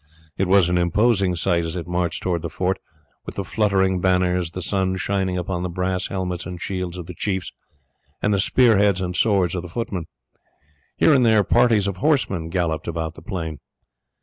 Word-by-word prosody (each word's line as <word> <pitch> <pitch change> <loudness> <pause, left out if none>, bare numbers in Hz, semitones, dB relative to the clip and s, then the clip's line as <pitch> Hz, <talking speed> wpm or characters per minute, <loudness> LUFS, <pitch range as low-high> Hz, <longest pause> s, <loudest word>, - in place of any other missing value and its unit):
It 95 - 0
was 95 -2 +5
an 90 0 +1
imposing 95 +1 +2
sight 85 0 +1
as 80 +1 -4
it 90 -1 -5
marched 90 -1 -2
towards 85 -3 -1
the 85 - -4
fort, 95 +4 -1 0.5
with - - -6
the 100 - -2
fluttering 95 -2 +1
banners, 90 -1 +1
the 85 - -7
sun 95 0 0
shining 95 -1 -1
upon 90 0 -3
the 90 - -2
brass 90 +1 -1
helmets 90 -2 -3
and 90 -1 -7
shields 90 -1 -4
of 90 - -6
the 90 - -8
chiefs, 95 0 -3 0.7
and 105 - +1
the 100 - +1
spear 115 +1 +4
heads 100 -2 +3
and 90 -1 -3
swords 95 -6 +2
of 90 - -2
the 90 - -9
footmen. 90 -4 -4 0.9
Here 160 - +5
and 130 -3 +4
there 110 -3 +4
parties 115 -2 +3
of 100 -2 -2
horsemen 95 - 0
galloped 85 -3 -1
about 80 -1 -3
the - - -13
plain. 80 -4 -5
90 Hz, 195 wpm, -22 LUFS, 85-100 Hz, 0.9 s, was